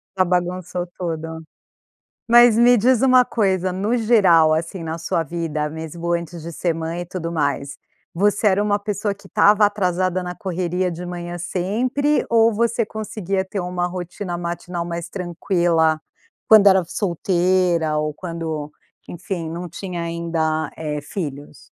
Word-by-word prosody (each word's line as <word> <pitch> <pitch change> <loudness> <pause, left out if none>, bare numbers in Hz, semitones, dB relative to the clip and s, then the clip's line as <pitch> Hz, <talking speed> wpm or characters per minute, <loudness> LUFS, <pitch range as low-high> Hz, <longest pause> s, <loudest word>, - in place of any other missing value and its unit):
Já 185 -1 +3
bagunçou 180 0 -1
toda. 160 -2 -4 0.9
Mas 240 -1 +7
me 240 +1 +6
diz 240 +2 +3
uma 255 -1 +6
coisa: 190 -5 0
no 200 +6 -1
geral, 190 -9 +5
assim, 165 +3 -3
na 160 0 -4
sua 165 0 -1
vida 155 -2 -3
mesmo 160 +2 -5
antes 170 0 -4
de 170 +2 -7
ser 170 +1 -1
mãe 165 +1 -4
e - - -5
tudo 170 -1 -5
mais, 145 -3 -2 0.4
você 205 +4 +2
era 200 +1 +3
uma 205 0 +1
pessoa 205 0 -2
que 200 0 -17
estava 210 +2 +5
atrasada 185 -2 0
na 180 0 -5
correria 180 -2 -2
de 175 +1 -6
manhã 175 0 -6
sempre? 230 - 0
Ou 230 0 +4
você 230 +1 +1
conseguia 200 -3 -3
ter 195 +1 -4
uma 180 0 -2
rotina 180 0 -5
matinal 175 0 -4
mais 170 0 -5
tranquila? 175 -3 +1 0.5
Quando 215 -2 +7
era 190 -2 +6
solteira 175 -3 +1
ou 150 0 -1
quando, 160 -3 -5 0.4
enfim, 175 -1 -5
não 170 +2 -5
tinha 180 0 -5
ainda, 165 -2 -2
eh, 150 -2 -3
filhos? 145 -2 -7
175 Hz, 150 wpm, -21 LUFS, 165-200 Hz, 0.9 s, Mas